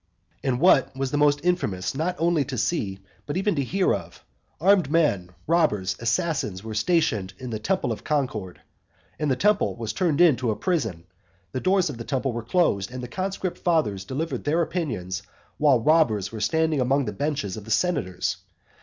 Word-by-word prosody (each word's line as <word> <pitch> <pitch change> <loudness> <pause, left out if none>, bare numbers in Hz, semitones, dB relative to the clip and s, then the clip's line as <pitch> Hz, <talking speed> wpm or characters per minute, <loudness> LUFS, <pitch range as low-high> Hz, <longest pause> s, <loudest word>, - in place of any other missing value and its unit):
VII. - - -5
And 125 -1 0
what 145 -6 +4
was 135 0 -3
most 145 0 +3
infamous 105 - 0
not 165 +6 -1
only 165 -2 +2
to 130 -1 -5
see, 105 - -1 0.3
but 145 - -2
even 200 +2 +1
to 140 -4 0
hear 185 +8 +1
of, 85 -4 -7 0.3
armed 185 -3 +4
men, 145 - +2 0.2
robbers, 125 - +2
assassins 120 - -1
were 110 0 -6
stationed 110 - +1
in 125 +1 -7
the 110 - -3
temple 155 - 0
of 110 - -5
Concord; 125 -11 -2 0.6
the 145 -4 +1
temple 210 +9 +2
was 115 -2 -4
turned 165 -1 +1
into 130 -9 +4
a 110 - +1
prison; 115 - -1 0.5
the - - -2
doors 185 +4 +2
of 120 - -10
the - - -4
temple 135 0 -1
were 120 - -3
closed, 115 - +1
and 125 0 -7
the - - -4
conscript 190 +3 -3
fathers 120 - +1
delivered 150 +10 -3
their 160 +4 +2
opinions 115 - -3 0.4
while 145 -5 +5
robbers 115 - +3
were 110 -2 -6
standing 155 +6 +1
among 135 +2 +2
the 105 - -3
benches 140 -6 -2
of 105 -2 -8
the - - -11
senators. 95 - 0
135 Hz, 180 wpm, -25 LUFS, 110-165 Hz, 0.6 s, while